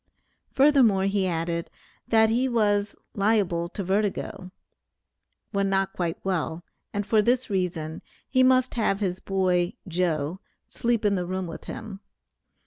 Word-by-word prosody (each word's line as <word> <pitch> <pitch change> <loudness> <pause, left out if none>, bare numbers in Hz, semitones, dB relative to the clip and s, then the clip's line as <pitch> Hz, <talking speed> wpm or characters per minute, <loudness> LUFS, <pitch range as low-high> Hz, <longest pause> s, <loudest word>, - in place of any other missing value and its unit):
Furthermore 265 -9 +4
he 195 -1 +1
added, 170 0 -2 0.4
that 220 -1 +4
he 250 +3 +1
was 205 -3 +1 0.2
"liable 195 -5 +1
to 200 - -5
vertigo," 195 -1 -2 1.0
when 200 -1 0
not 195 0 0
quite 170 -2 -2
well, 175 -3 -2 0.3
and 205 0 -2
for 215 +1 +3
this 245 +1 +1
reason 170 -4 -2 0.3
he 260 - +2
must 255 0 +4
have 205 -4 +1
his 185 -3 -1
boy 185 -2 +1
"Joe" 170 -1 -1 0.3
sleep 235 -2 -1
in 205 - +3
the 180 -2 -1
room 185 0 -2
with 165 - -8
him. 220 -3 -7
195 Hz, 135 wpm, -26 LUFS, 180-220 Hz, 1.0 s, Furthermore